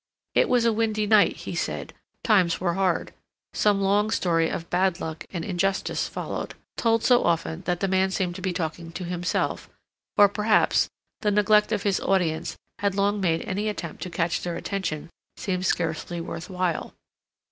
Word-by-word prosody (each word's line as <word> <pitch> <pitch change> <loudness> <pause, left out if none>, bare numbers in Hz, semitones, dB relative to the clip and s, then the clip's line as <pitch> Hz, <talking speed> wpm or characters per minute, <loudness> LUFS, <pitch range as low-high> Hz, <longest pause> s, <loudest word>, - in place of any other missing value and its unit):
It - - +3
was 245 -2 +3
a 230 - +4
windy 215 -1 0
night, 210 -1 +5
he - - -4
said; - - -3 0.3
times 185 -7 +3
were 175 -1 0
hard; 185 -2 0 0.4
some 205 -2 +2
long 205 +2 +3
story 165 -5 +2
of 165 - -4
bad 185 0 +2
luck 160 -2 -6
and 170 -3 -4
injustice 195 +1 0
followed, - - -5 0.2
told 230 -1 +2
so 245 -1 +5
often 165 0 0
that 175 -1 -1
the 195 - +2
man 190 0 +2
seemed 185 -2 -1
to 185 - -8
be 185 0 -1
talking 165 -1 -4
to 180 - -5
himself, 175 0 -2 0.5
or, 205 - +8
perhaps, 210 +2 +2 0.3
the 210 - +1
neglect 210 +1 +4
of 210 -3 0
his 200 -2 +1
audience 175 -5 0 0.2
had 200 -1 0
long 200 +1 +1
made 165 -3 +1
any 205 +3 -2
attempt 210 - -6
to 180 - -4
catch 165 0 -1
their 175 -1 -3
attention 175 -5 -3 0.3
seem 185 -2 -2
scarcely 170 -1 -1
worth 165 +1 -6
while. 180 -3 -2
190 Hz, 175 wpm, -25 LUFS, 170-205 Hz, 0.5 s, or